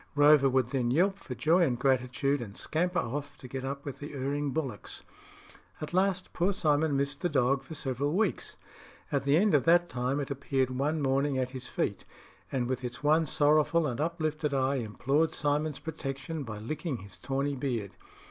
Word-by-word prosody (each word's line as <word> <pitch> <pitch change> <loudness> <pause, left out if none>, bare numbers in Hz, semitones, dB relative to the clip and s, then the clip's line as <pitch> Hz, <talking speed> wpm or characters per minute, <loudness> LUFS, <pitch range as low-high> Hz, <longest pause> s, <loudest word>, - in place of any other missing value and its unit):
Rover 145 -1 +6
would 130 -2 +2
then 125 -2 0
yelp 190 +9 +2
for 130 - -7
joy 165 +8 +3
and 130 -8 +2
gratitude, 130 +2 +1
and 105 -4 -8
scamper 180 +3 -1
off 145 +4 -3
to 130 - -10
get 130 +1 -5
up 140 +1 -4
with 140 - -6
the 145 0 -7
erring 140 +2 -1
bullocks. 135 -8 -4 0.8
At 155 +1 -5
last 185 0 +1
poor 180 +3 +1
Simon 150 -5 +2
missed 140 +1 -1
the 175 - +1
dog 135 -2 +2
for 145 +4 -9
several 140 +2 -1
weeks; 200 0 -1 0.5
at 140 -2 0
the 140 +2 +4
end 200 +1 +3
of 145 - +4
that 175 +1 +5
time 125 +3 -1
it 140 -1 -3
appeared 135 -1 0
one 145 +4 0
morning 135 +1 +1
at 130 -1 -1
his 130 -1 -6
feet, - - -2 0.5
and 125 -3 0
with 130 0 -2
its 120 +3 -6
one 155 +2 +4
sorrowful 155 +3 +3
and 130 -1 -2
uplifted 155 -3 -1
eye 135 +1 +1
implored 135 +7 0
Simon's 150 0 0
protection 155 0 -5
by 110 -4 -6
licking 140 - -4
his 100 -2 -11
tawny 140 +1 -1
beard. 120 -7 -2
140 Hz, 185 wpm, -30 LUFS, 130-155 Hz, 0.8 s, Rover